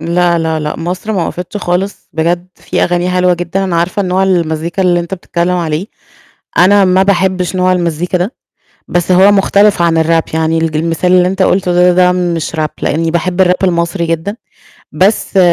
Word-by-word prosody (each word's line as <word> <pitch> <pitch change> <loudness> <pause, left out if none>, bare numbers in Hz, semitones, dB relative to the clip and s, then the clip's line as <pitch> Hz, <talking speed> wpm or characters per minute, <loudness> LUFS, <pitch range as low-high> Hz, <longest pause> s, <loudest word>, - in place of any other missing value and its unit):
لا، 170 +1 +1
لا، 160 -1 -1
لأ، 150 0 -4
مصر 180 +6 -4
ما 180 -5 -1
وقفِتش 180 +4 -6
خالص، 190 +1 -3
بجد 175 +2 -1
فيه - - -3
أغاني 175 +1 -1
حلوة 180 0 +2
جدًا، 175 +3 -3
أنا 175 -3 -1
عارفة 185 +5 0
نوع 185 +1 0
المزيكا، 170 -1 -1
اللي 175 -1 +2
أنت 170 +2 -5
بتتكلم 175 0 -2
عليه. 165 +2 -2 0.7
أنا 195 +2 +5
ما 185 +1 +3
باحبش 185 -1 0
نوع 185 0 +2
المزيكا 175 0 -1
ده. 185 +8 -3 0.5
بس 175 +1 -1
هو 190 +3 +5
مختلف 200 -1 +3
عن 165 -1 +2
الrap 165 0 0
يعني 160 0 0
الج 160 -1 -1
المثال 165 +2 0
اللي 180 0 +4
أنت 190 +1 -2
قلته 185 -1 +1 0.2
د - - -1
ده 180 0 +4
مش 170 -3 -2
rap، 155 -1 0
لأني 165 +2 -1
باحب 180 +2 +1
الrap 180 - +3
المصري 170 0 0
جدًا، 165 +6 -3 0.6
بس 195 0 +1
180 Hz, 180 wpm, -13 LUFS, 170-185 Hz, 0.7 s, أنا